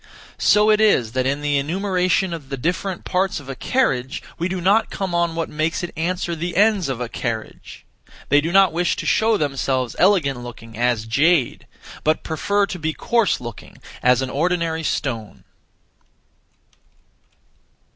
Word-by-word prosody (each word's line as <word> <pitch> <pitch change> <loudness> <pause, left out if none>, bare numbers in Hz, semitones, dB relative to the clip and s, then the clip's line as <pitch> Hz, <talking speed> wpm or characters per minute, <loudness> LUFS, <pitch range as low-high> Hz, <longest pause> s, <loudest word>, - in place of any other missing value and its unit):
So 210 +1 +4
it 215 0 +3
is 130 - +3
that 130 +1 0
in 140 +2 -1
the 145 -1 +1
enumeration 185 +3 0
of 150 -5 -8
the 135 - -4
different 180 +6 -2
parts 190 -1 0
of 140 - -13
a - - -3
carriage 135 - -1 0.2
we 170 - 0
do 185 0 -3
not 200 +5 +3
come 190 -3 -4
on 170 -1 +1
what 165 -1 -2
makes 155 +3 -2
it 175 - -5
answer 175 +1 -2
the 170 +2 -4
ends 205 -6 +3
of 130 -3 -3
a 125 - -3
carriage. 115 -2 -6 0.4
They 145 +1 +5
do 165 +3 -2
not 190 -2 +5
wish 175 +1 +1
to - - -6
show 220 0 +3
themselves 135 -4 -1
elegant 170 -10 +3
looking 115 -2 -10
as 120 -1 0
jade, 140 +4 +1 0.4
but 155 +1 +1
(prefer) 200 +6 0
to 185 -2 -7
be 160 0 -2
coarse 230 +3 +1
looking 120 -4 -10 0.2
as 125 +1 +3
an 130 - -4
(ordinary) 165 +1 0
stone. 120 -8 -3
160 Hz, 165 wpm, -21 LUFS, 130-185 Hz, 0.4 s, They